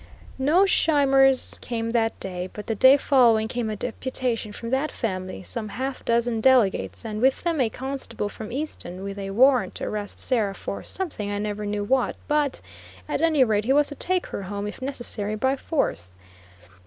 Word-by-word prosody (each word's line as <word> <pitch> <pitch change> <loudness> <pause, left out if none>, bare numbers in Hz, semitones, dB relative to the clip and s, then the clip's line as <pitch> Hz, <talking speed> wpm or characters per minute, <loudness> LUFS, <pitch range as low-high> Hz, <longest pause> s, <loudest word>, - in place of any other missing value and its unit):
No 315 +9 +4
Scheimers 270 -7 +3
came 230 -2 -3
that 225 -1 0
day; 180 -1 -4
but 210 - -7
the 225 - -1
day 260 +5 +7
following 235 -6 +4
came 235 -1 -2
a 215 - -2
deputation 245 -1 -3
from 230 +2 -7
that 270 +4 0
family, 185 -4 -4
some 215 +2 -4
half 265 +4 -4
dozen 235 -1 +1
delegates, 245 -3 +3
and 215 -1 -4
with 265 +1 +3
them 335 -5 +1
a 235 - +2
constable 265 -3 -4
from 215 +2 -8
Easton, 230 - -5
with 200 0 -5
a 195 0 -4
warrant 250 +5 +4
to - - -6
arrest 205 -1 -4
Sarah 215 -6 0
for 200 - -5
something 315 - -4
I 205 - -2
never 210 0 -3
knew 205 0 -2
what 255 +4 +1
but 295 -2 0 0.5
at - - -1
any 315 -4 +4
rate 215 -3 +1
he 265 - +3
was 290 +1 +4
to 290 - -7
take 365 +4 0
her - - -5
home 200 +1 -4
if 210 - -7
necessary 240 -6 -4
by 260 +5 +1
force. 90 - -2
235 Hz, 185 wpm, -25 LUFS, 210-270 Hz, 0.5 s, day